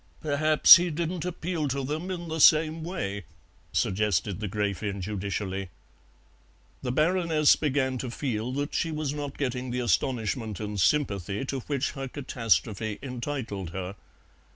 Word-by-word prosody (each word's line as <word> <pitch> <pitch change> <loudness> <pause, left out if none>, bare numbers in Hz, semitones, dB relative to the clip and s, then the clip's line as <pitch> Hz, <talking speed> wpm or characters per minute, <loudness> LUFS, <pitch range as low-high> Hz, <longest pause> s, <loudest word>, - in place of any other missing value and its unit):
"Perhaps 155 +1 +7
he 175 +1 -1
didn't 170 +2 -3
appeal 170 -3 -2
to 135 0 -2
them 155 +7 -3
in 175 -2 -4
the 160 0 -3
same 155 +1 +5
way," 100 - -4 0.5
suggested 105 -2 0
the 105 -2 -3
Gräfin 100 0 -2
judicially. 95 -1 -3 1.1
The 125 - -2
Baroness 160 +1 +3
began 130 -3 0
to 125 - -4
feel 120 -2 -3
that 145 +2 -3
she 165 - 0
was 150 -2 -2
not 145 -2 -5
getting 130 -2 -2
the 125 +1 -2
astonishment 115 - -1
and 105 -1 -4
sympathy 100 - +1
to 135 0 -3
which 140 +2 -2
her 135 -2 -5
catastrophe 115 -5 -1
entitled 120 - -4
her. 95 0 -4
130 Hz, 140 wpm, -27 LUFS, 105-150 Hz, 1.1 s, Perhaps